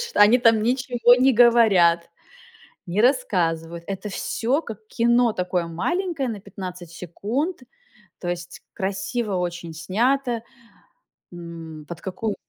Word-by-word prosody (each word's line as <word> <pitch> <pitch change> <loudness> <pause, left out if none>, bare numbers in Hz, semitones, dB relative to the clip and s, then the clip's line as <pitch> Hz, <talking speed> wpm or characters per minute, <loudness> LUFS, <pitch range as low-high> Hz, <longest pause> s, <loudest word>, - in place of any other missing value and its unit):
чт 475 0 -6
Они 210 +4 +7
там 230 -3 +4
ничего 245 0 +3
не 260 +1 +4
говорят, 215 -9 +4 0.8
не 180 +4 -1
рассказывают. 170 - 0
Это 195 +1 -5
всё, 255 +9 -1
как 220 -6 -8
кино 235 0 +2
такое 180 -2 -2
маленькое, 300 - -2
на 215 -3 -5
15 180 -3 -8
секунд, 215 - -3 0.6
то 175 - -6
есть 175 -1 -6
красиво 195 +3 -2
очень 175 -2 -4
снято. 235 - 0 0.9
М, 165 -3 -9
под 170 -1 -7
какую 205 +3 -3
205 Hz, 120 wpm, -23 LUFS, 175-245 Hz, 0.9 s, Они